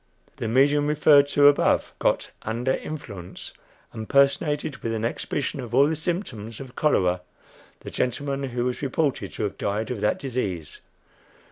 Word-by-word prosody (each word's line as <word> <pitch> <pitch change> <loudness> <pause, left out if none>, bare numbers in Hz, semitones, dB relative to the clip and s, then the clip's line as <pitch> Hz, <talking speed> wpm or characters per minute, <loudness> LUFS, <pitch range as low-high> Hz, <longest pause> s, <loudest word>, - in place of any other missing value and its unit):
The - - -3
medium 140 +5 +3
above 150 +1 0
referred 145 -2 +6
to 145 0 +4 0.2
got - - 0
"under 120 +4 -1
influence," 100 - -7 0.4
and 110 -1 -7
personated, 140 +1 +2
with 115 0 -3
an 110 0 -2
exhibition 140 +4 -3
of 120 -2 -5
all 140 +2 +7
the 160 +2 0
symptoms 145 - -4
of 130 -2 -10
cholera, 90 -12 +2 0.6
the - - -8
gentleman 140 +2 -2
who 120 0 -2
was 125 -1 -2
reported 140 +1 -1
to - - -4
have 105 - -3
died 105 +4 -2
of 115 -5 -4
that 105 - +2
disease. 105 - -4
130 Hz, 155 wpm, -25 LUFS, 110-145 Hz, 0.6 s, all